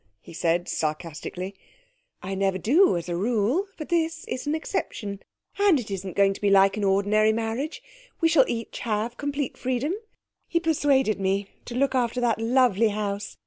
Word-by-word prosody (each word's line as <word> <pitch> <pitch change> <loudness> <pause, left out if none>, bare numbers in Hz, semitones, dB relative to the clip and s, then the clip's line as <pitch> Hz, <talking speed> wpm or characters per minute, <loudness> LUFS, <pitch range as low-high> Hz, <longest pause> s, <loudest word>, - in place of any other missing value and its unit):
he 95 - -14
said 170 +1 0
sarcastically. 165 +4 -4 0.7
'I 190 +1 -4
never 195 -1 0
do, 270 - +4
as 170 - -5
a 175 - -2
rule. 235 - +1
But 305 - -7
this 330 -1 0
is 255 +3 -4
an 300 - +1
exception. 205 -9 -4 0.4
And 400 -7 +5
it 220 -4 -7
isn't 190 -2 -5
going 195 0 +4
to - - -12
be 205 - +2
like 195 0 +5
an 210 - -3
ordinary 205 +2 +3
marriage. 230 +7 -3 0.4
We 330 - +4
shall 315 -5 +5
each 230 -1 -4
have 225 +1 -2
complete 285 -1 -3
freedom. 260 +6 -1 0.5
He 335 - +1
persuaded 280 -9 +2
me 195 +1 0 0.2
to 240 - -7
look 270 +1 +1
after 250 -1 0
that 235 -2 +1
lovely 230 -2 +3
house. 205 -1 -4
225 Hz, 175 wpm, -25 LUFS, 195-270 Hz, 0.7 s, And